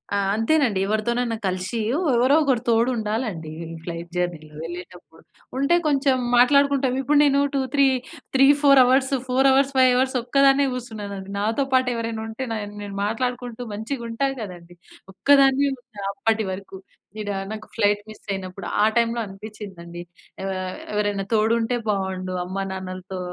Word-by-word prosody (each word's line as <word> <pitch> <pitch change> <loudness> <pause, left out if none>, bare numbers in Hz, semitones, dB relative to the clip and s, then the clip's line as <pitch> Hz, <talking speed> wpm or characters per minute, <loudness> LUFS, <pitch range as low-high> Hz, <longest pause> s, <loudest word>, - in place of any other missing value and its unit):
ఆ! - - +2 0.2
అంతేనండి. 225 -2 +2
ఎవరితోనైనా 235 +2 0
కలిషి, 185 +5 -2 0.2
ఎవరో 275 -5 +3
ఒకరు 265 -5 +1
తోడు 230 +2 +3
ఉండాలండి, 215 -7 -3
ఈ - - -7 0.2
ఫ్లైట్ 170 0 -6
జర్నీలో 160 -4 -3
వెళ్ళేటప్పుడు. 175 -1 -10 0.3
ఉంటే 275 +6 +3
కొంచెం 275 -2 +2 0.2
మాట్లాడుకుంటాం. 280 0 +4
ఇప్పుడు 290 +3 +2
నేను 280 -1 +3
two, 275 - +1
three 280 -1 +5 0.5
three 270 +1 +6 0.2
four 275 -2 +7
hours, 260 +2 +3 0.2
4 260 +2 +3
hours 275 +1 +3
5 255 -1 +6
hours 260 +1 +1
ఒక్కదాన్నే 275 +2 +4
కూసునేదాన్ని. 205 -6 -6
నాతో 220 +7 0
పాటు 255 -1 +4
ఎవరైనా 230 -1 -3
ఉంటే 225 +4 -5
నాయన్ 205 -2 -5
నేను 200 -1 -7
మాట్లాడుకుంటూ 245 +2 -3
మంచిగా 235 +5 -4
ఉంటా 230 +4 0
కదండి! 175 -4 -9 0.4
ఒక్కదాన్నే 275 +3 +4
ఉన్న 215 -5 -9
అప్పటి 220 +2 0
వరకు. 190 0 -8 0.4
ఈడ 210 -1 -4 0.2
నాకు 215 0 -7
ఫ్లైట్ 205 -2 +2
మిస్ 215 - -13
అయినప్పుడు 190 0 -6 0.2
ఆ - - +5
టైమ్‌లో 235 0 +2
అనిపిచ్చిందండి. 195 -4 -9 0.4
ఆహ్, 185 -1 -3 0.2
ఎవరైనా 205 -1 0
తోడు 220 +1 +3
ఉంటే 240 +2 0
బావుండు. 190 -2 -2
అమ్మ, 185 +2 -6
నాన్నలతో 185 0 -6
225 Hz, 145 wpm, -23 LUFS, 195-260 Hz, 0.5 s, four